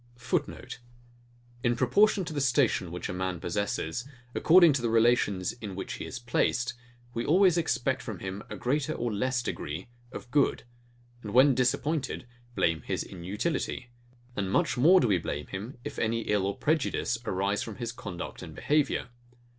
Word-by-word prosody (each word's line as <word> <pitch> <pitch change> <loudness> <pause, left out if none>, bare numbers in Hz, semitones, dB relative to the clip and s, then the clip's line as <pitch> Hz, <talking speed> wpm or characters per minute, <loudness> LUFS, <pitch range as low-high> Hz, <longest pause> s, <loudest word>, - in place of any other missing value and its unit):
[Footnote: 120 +1 -3 0.8
In 120 0 +2
proportion 190 - +3
to 165 - -5
the 145 - -1
station 125 -8 +2
which 90 - -4
a - - -4
man 90 -1 -2
possesses, 100 +1 -2 0.3
according 170 -2 +6
to 135 - -1
the 120 - 0
relations 115 -5 +3
in 105 -5 -7
which 95 - -5
he - - -6
is 130 - -6
placed; 120 0 0 0.4
we 115 - -2
always 180 +4 +5
expect 135 -6 0
from 110 -6 -6
him 95 +3 -5
a - - -5
greater 145 +4 0
or 120 -6 -2
less 120 +3 0
degree 80 0 -5 0.2
of 125 - -9
good, 145 -1 +2 0.6
and 105 0 -6
when 135 +2 +7
disappointed, 130 +3 0 0.3
blame 80 -1 +1
his - - -2
inutility; 105 - -3 0.4
and 95 -2 -2
much 120 - +2
more 165 +9 +6
do 125 - +2
we 95 -4 +3
blame 75 -2 -4
him, 105 +8 -7
if - - -6
any 115 +1 0
ill 105 -3 +1
or 100 - -3
prejudice 145 -6 0
arise 100 +2 0
from 110 - -5
his 120 -2 -4
conduct 90 -6 -7
and - - -9
behaviour. 145 -4 +1
120 Hz, 170 wpm, -29 LUFS, 100-135 Hz, 0.8 s, when